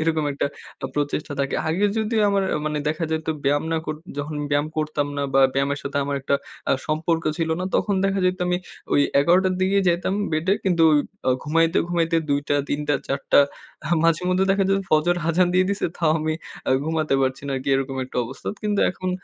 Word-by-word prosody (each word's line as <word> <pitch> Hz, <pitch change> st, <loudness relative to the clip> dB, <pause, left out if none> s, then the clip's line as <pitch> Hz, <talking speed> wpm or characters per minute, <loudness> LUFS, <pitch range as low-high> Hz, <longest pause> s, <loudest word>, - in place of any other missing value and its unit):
এরকম 155 Hz, -1 st, +1 dB
একটা 140 Hz, -, -1 dB, 0.4 s
প্র -, -, -1 dB
প্রচেষ্টা 145 Hz, 0 st, -2 dB
থাকে। 140 Hz, -, -1 dB
আগে 180 Hz, +6 st, +1 dB
যদিও 220 Hz, 0 st, +1 dB
আমার 200 Hz, -1 st, +2 dB
আ -, -, +1 dB
মানে 150 Hz, 0 st, -1 dB
দেখা 155 Hz, +2 st, -1 dB
যাইতো 160 Hz, 0 st, -1 dB
ব্যায়াম 145 Hz, +2 st, +2 dB
না 165 Hz, -, +1 dB
কর 155 Hz, -, -2 dB, 0.2 s
যখন 150 Hz, +1 st, -4 dB
ব্যায়াম 145 Hz, +1 st, +2 dB
করতাম 155 Hz, -2 st, -1 dB
না 140 Hz, -, -1 dB
বা 135 Hz, -, +6 dB
ব্যায়ামের 140 Hz, +1 st, 0 dB
সাথে 140 Hz, 0 st, -4 dB
আমার 140 Hz, 0 st, -2 dB
একটা 140 Hz, +1 st, 0 dB, 0.4 s
আ -, -, +5 dB
সম্পর্ক 160 Hz, +1 st, 0 dB, 0.2 s
ছিল 165 Hz, -1 st, 0 dB
না। -, -, -1 dB
তখন 205 Hz, -, +1 dB
দেখা 195 Hz, 0 st, +1 dB
যাইতো 185 Hz, 0 st, +1 dB
আমি 180 Hz, -, +2 dB, 0.3 s
ঐ -, -, -1 dB, 0.3 s
১১ঃ০০ 180 Hz, +5 st, +4 dB
র 185 Hz, -, -1 dB
দিকেই 195 Hz, +1 st, +2 dB
যাইতাম 175 Hz, +2 st, +1 dB, 0.2 s
বেডে 160 Hz, +5 st, +1 dB
কিন্তু 175 Hz, -4 st, +2 dB
ঐ -, -, +5 dB, 0.3 s
অ -, -, +5 dB
ঘুমাইতে, 165 Hz, +3 st, +2 dB
ঘুমাইতে 165 Hz, -1 st, +1 dB
২ঃ০০ 145 Hz, 0 st, 0 dB
৩ঃ০০ 145 Hz, 0 st, 0 dB
৪ঃ০০ 140 Hz, +1 st, +2 dB, 0.5 s
আ -, -, -4 dB, 0.2 s
মাঝে 165 Hz, +1 st, +3 dB
মধ্যে 185 Hz, +1 st, +2 dB
দেখা 195 Hz, 0 st, +2 dB
যেতো 195 Hz, 0 st, +2 dB
ফজর 155 Hz, +3 st, +3 dB
আযান 175 Hz, +2 st, +3 dB
দিয়ে 185 Hz, -, +4 dB
দিছে, 200 Hz, -, 0 dB
তাও 165 Hz, -3 st, +2 dB
আমি 155 Hz, 0 st, -1 dB, 0.3 s
আ -, -, +2 dB
ঘুমাতে 160 Hz, -2 st, 0 dB
পারছি 130 Hz, 0 st, -1 dB
না, -, -, -3 dB
আরকি 130 Hz, +1 st, -4 dB
এরকম 135 Hz, 0 st, -1 dB
একটা 130 Hz, -, -10 dB
অবস্থা। 130 Hz, +3 st, -7 dB
কিন্তু 205 Hz, -1 st, 0 dB
এখন 185 Hz, 0 st, -4 dB
160 Hz, 210 wpm, -23 LUFS, 145-185 Hz, 0.5 s, বা